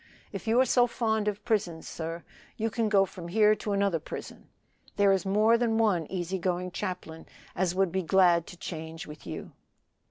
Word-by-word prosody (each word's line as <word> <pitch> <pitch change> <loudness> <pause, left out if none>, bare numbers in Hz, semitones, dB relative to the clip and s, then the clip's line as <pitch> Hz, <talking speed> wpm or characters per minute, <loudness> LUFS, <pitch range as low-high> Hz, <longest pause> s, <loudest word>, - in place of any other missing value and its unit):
If - - -7
you 230 +3 +4
are 260 - +5
so 245 0 +4
fond 220 -3 -1
of 205 0 -3
prisons, 180 -7 -1
sir, 165 +1 -5 0.3
you 225 0 -1
can 225 0 0
go 195 -2 +5
from 175 -2 -9
here 210 +3 +4
to 205 - -4
another 200 -4 +1
prison. 155 - -9 0.5
There 200 -1 +4
is 195 -1 +1
more 215 +4 +4
than 230 -2 +1
one 195 -8 +2
easy 185 0 -2
going 180 0 -1
chaplain 180 -4 -5 0.3
as 180 0 0
would 190 -2 +2
be 190 +2 0
glad 175 -1 +4
to 175 - -11
change 160 -1 -6
with 150 - -11
you. 80 - -6
190 Hz, 190 wpm, -28 LUFS, 170-215 Hz, 0.5 s, are